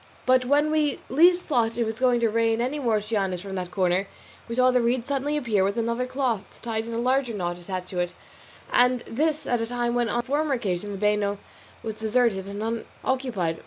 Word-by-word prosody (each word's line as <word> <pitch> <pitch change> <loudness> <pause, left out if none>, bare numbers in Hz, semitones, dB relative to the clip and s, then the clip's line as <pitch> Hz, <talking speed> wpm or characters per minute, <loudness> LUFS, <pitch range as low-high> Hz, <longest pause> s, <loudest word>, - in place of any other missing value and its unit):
But 255 0 +4
when 290 +3 +3
we 300 -2 +1
least 350 +6 +5
thought 235 -6 0
it 240 - +2
was 220 +1 -4
going 250 -2 +3
to 230 - +3
rain 225 0 +2
any 260 +5 -1
more 235 -5 +2
cianis 200 -4 -1
from 195 0 -7
that 180 -2 -3
quarter, 185 +1 +1 0.4
we 230 - -4
saw 255 +1 +5
the 250 -1 +3
reed 235 +1 +1
suddenly 280 +2 -1
appear 225 -9 +1
with 200 +3 0
another 235 +2 -1
cloth 250 -6 -2
tied 225 -1 -2
in 230 - -4
a - - -1
larger 250 -1 +1
knot 175 -2 -3
attached 185 0 -5
to 180 - -3
it, 175 0 -2 0.6
and 250 0 +4
this 305 +7 -1
at 245 -2 0
a 230 - -1
time 240 0 -1
when, 240 -1 +1
as - - -2
on 240 - +2
the - - -22
former 290 +1 +1
occasion, 205 -3 -2
the 200 - -5
bano 210 0 +1 0.5
was 220 -1 -3
deserted 220 -3 +1
and 200 +2 -5 0.4
unoccupied. 230 -12 -1
235 Hz, 220 wpm, -25 LUFS, 205-255 Hz, 0.6 s, least